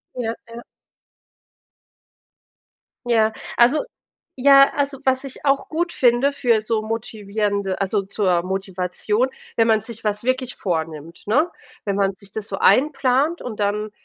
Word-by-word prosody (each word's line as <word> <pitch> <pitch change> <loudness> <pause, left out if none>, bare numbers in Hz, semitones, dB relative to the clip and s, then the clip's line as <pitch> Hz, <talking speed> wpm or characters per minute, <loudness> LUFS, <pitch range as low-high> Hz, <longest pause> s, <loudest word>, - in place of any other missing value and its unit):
Ja. 235 -3 -2
Ja. 235 +1 -10 2.4
Ja. 220 -2 +2 0.2
Also 245 - +4 0.5
ja, 275 +1 +6
also 280 -1 -1
was 265 0 +1
ich 270 - -9
auch 275 0 +1
gut 340 +2 -1
finde 245 +2 +3
für 240 -5 +2
so 220 0 0
motivierende 205 -3 -2
also 195 +1 0
zur 190 -3 0
Motivation, 190 +5 -1 0.3
wenn 225 -1 +4
man 220 -1 +3
sich 230 0 -8
was 210 0 -1
wirklich 255 0 -1
vornimmt, 165 -2 -4
ne? 300 +11 +2 0.3
Wenn 200 -2 -1
man 195 -1 +1
sich 200 +1 -15
das 215 -1 -6
so - - -4
einplant 280 +3 +2
und 220 -4 -6
dann 210 +1 -1
220 Hz, 135 wpm, -21 LUFS, 200-260 Hz, 2.4 s, ja